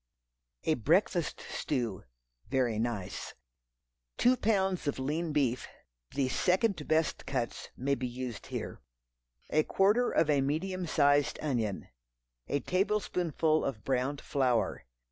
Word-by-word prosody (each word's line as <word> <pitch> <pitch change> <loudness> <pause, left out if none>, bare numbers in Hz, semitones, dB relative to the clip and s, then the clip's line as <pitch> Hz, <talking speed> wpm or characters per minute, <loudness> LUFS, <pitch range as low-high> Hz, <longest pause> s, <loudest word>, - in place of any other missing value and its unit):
A 160 - +3
Breakfast 165 - +1
Stew 120 -9 -2 0.4
(very 125 -4 +1
nice). 110 -5 -3 0.8
Two 250 +1 +5
pounds 190 -8 +1
of 145 - 0
lean 155 +5 -1
beef. 135 -5 +1 0.5
(The 135 -2 +2
"second 180 - +1
best 160 0 +1
cuts" 125 -4 -3
may 140 +2 0
be 130 -2 -1
used 125 -2 -6
here.) - - -5 0.7
A 155 - +4
quarter 205 +9 +3
of 160 - +2
a 145 -2 +3
medium 175 +6 -1
sized 145 -1 +3
onion. 115 -9 -1 0.6
A 145 - 0
tablespoonful 180 -5 +1
of 110 -6 -3
browned 135 +2 0
flour. 130 -4 0
145 Hz, 120 wpm, -31 LUFS, 130-175 Hz, 0.8 s, Two